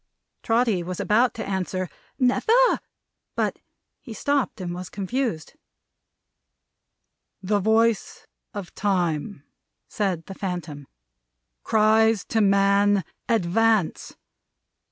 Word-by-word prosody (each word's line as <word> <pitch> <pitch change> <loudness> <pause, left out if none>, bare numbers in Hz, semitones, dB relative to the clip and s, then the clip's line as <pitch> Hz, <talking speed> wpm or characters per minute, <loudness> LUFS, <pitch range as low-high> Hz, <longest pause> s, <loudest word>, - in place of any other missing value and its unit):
Trotty 225 -5 +1
was 180 +1 -5
about 210 +5 +2
to 225 - -5
answer 185 -1 -2 0.3
"Never!" 455 - +3 0.6
But - - -1 0.4
he 230 -5 -10
stopped 280 0 -1
and 175 -2 -4
was 180 0 -7
confused. 200 - -3 1.9
"The 205 +2 +1
voice 220 +1 +1 0.3
of 200 -4 -7
Time," 180 -4 -1 0.4
said 185 -6 -2
the 195 - -8
Phantom, 175 -7 -5 0.7
"cries 220 -1 +3
to 225 - +2
man, 200 0 +3 0.3
Advance! 220 -2 +1
200 Hz, 95 wpm, -24 LUFS, 185-225 Hz, 1.9 s, Never